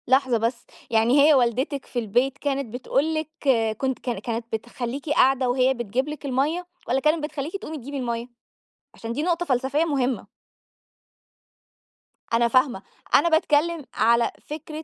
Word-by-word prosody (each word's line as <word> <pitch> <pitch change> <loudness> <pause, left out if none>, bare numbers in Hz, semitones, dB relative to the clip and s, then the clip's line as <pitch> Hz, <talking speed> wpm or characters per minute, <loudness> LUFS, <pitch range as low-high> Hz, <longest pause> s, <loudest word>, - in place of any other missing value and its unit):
لحظة 260 -1 +3
بس، 230 +2 -2 0.3
يعني 235 +5 +4
هي 305 +2 +7
والدتِك 260 +2 +1
في 245 - -3
البيت 245 +5 0
كانت 275 -5 -2
بتقول 275 +5 0
لِك 310 -1 -2 0.5
كنت 265 0 -1
كان 240 -6 -3
كانت 230 +2 -4
بتخليكِ 240 +5 -4
قاعدة 265 -3 +3
وهي 255 +1 +3
بتجيب 240 +3 -2
لِك 300 -1 -7
المَيَّة، 285 +7 0 0.2
والّا 255 +3 +2
كانت 305 +2 +1
بتخليكِ 300 +2 -4
تقومي 320 -5 -7
تجيبي 280 +2 -6
المَيَّة؟ 235 -2 -3 0.7
عشان 230 0 -6
دي 295 - -2
نقطة 350 0 0
فلسفية 270 +3 +1
مهمة. 260 - -1 2.1
أنا 235 +1 +4
فاهمة. 255 -4 +2 0.3
أنا 340 - +5
باتكلّم 320 -1 +2
على 235 +1 +3 0.2
فكرة 305 +1 -6
265 Hz, 145 wpm, -24 LUFS, 240-295 Hz, 2.1 s, هي